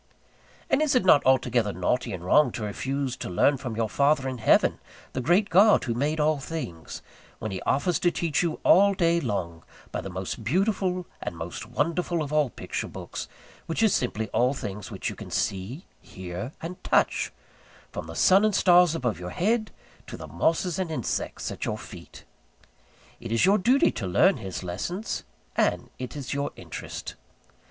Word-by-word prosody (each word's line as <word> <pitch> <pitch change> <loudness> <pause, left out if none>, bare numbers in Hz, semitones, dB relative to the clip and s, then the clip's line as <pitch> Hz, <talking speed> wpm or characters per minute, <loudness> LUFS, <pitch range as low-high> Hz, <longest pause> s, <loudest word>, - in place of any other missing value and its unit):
And - - +2
is 305 -4 +2
it 250 - +3
not 150 -6 +6
altogether 120 -4 +3
naughty 100 +7 -1
and 90 -2 -6
wrong 145 +7 +5
to 110 - -4
refuse 130 +5 -2
to - - -5
learn 135 +11 +3
from 125 -4 -5
your 115 0 0
Father 140 +3 +2
in 130 -2 -4
Heaven, 110 - +3 0.3
the 130 - -2
Great 180 - +2
God 200 +5 +6
who 120 - -1
made 145 +6 -1
all 150 0 +2
things, 135 - -6 0.3
when 110 - -5
he 95 - -4
offers 155 +5 +1
to 175 - +3
teach 170 -3 0
you 170 -3 -1
all 200 +2 +6
day 170 -1 +3
long 90 - -3 0.3
by - - -3
the 95 - -6
most 95 +4 -5
beautiful 185 - 0 0.2
and 85 - -5
most 85 +1 -6
wonderful 165 +6 -1
of 150 0 -6
all 150 -3 +3
picture - - -5
books, - - -7 0.4
which 165 +7 0
is 220 - +4
simply 110 -3 -1
all 125 +3 +2
things 105 -5 -6
which - - -5
you - - -3
can - - -9
see, 100 - -2 0.2
hear, 95 +7 -7
and 175 +2 -7
touch, - - +2 0.6
from - - -6
the 80 - -8
sun 190 - +5
and 215 -2 +2
stars 180 -3 +5
above 120 - -1
your 90 0 -5
head 215 - 0 0.4
to - - -7
the 80 - -8
mosses 165 - 0
and 185 -3 -1
insects 130 -8 -3
at - - -6
your - - -2
feet? - - -12 1.0
It 115 -1 -7
is 115 +7 +3
your 200 +3 +4
duty 250 +8 +4
to 95 - -4
learn 100 - +4
His 95 -1 -6
lessons: 175 - -4 0.3
and - - +1
it 125 0 -6
is 140 -3 -4
your 140 +1 -1
interest. - - -7
140 Hz, 185 wpm, -26 LUFS, 105-175 Hz, 1.0 s, not